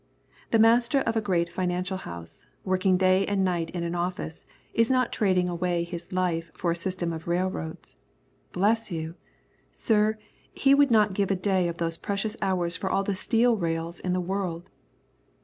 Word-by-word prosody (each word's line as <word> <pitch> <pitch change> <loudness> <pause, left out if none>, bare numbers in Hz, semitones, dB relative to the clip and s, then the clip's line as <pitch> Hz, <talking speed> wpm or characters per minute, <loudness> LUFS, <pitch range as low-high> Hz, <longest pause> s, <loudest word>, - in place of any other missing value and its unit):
The 225 - +3
master 235 +4 +4
of 230 - -1
a 225 - +2
great 180 -5 +1
financial 180 +1 -2
house, 85 - -8 0.2
working 185 0 +2
day 185 +1 +4
and 200 -1 +1
night 175 -3 -1
in 175 -1 -4
an 170 0 -2
office, 175 -2 -4 0.3
is 230 0 +3
not 255 -2 +2
trading 185 -4 +2
away 175 0 -1
his 170 0 -7
life 175 -3 -1
for 175 - 0
a - - 0
system 175 -1 -2
of 160 0 -7
railroads. 175 -2 -3 0.5
Bless 215 +3 +1
you! 160 -1 -4 0.6
sir, 215 -1 +2 0.4
he 275 0 +4
would 285 0 +5
not 210 -4 +4
give 200 0 0
a 195 - +2
day 185 -1 +1
of 170 0 -4
those 165 -1 -2
precious 210 +1 -2
hours 180 -3 +1
for 190 +3 -2
all 195 - +1
the 200 - -1
steel 230 +4 +2
rails 165 -1 -2
in 180 - -2
the 185 - +1
world. 180 -2 -3
185 Hz, 180 wpm, -27 LUFS, 170-205 Hz, 0.6 s, would